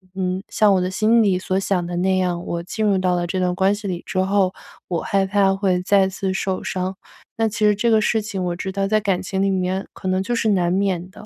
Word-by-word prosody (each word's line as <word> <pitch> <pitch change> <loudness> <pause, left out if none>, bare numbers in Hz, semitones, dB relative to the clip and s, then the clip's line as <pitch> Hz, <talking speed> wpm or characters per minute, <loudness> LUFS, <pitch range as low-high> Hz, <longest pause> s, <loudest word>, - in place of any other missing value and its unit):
嗯， 185 0 -2
像 210 -2 +3
我 185 - +3
的 180 - -1
心 225 +4 +3
里 190 -3 +2
所 190 +1 -1
想 185 -3 -1
的 175 0 -5
那 185 +1 +1
样， 180 -2 -1
我 170 0 -3
进 215 +4 -3
入 200 -2 +3
到 185 -1 +1
了 175 - -1
这 185 +2 -2
段 180 -1 +1
关 195 +2 +2
系 205 -1 -7
里 175 -2 -3
之 185 - -2
后， 190 0 +2 0.3
我 170 -3 -2
害 195 -1 +1
怕 195 0 +2
会 185 -2 +1
再 195 0 +3
次 190 0 -3
受 190 0 -2
伤。 185 +1 -3 0.4
那 225 - +2
其 215 - -6
实 210 - +5
这 235 +4 +1
个 220 -1 +4
事 220 +1 +1
情 200 -3 -4
我 175 -1 -1
知 190 - -5
道 195 0 -1
在 215 +1 +2
感 195 -3 0
情 190 0 -3
里 195 - +2
面 185 +1 -1
可 190 - -7
能 185 0 +1
就 240 +4 -2
是 225 -1 +1
难 175 -3 +2
免 185 -2 -1
的， 215 - -13
190 Hz, 285 characters per minute, -21 LUFS, 185-200 Hz, 0.4 s, 实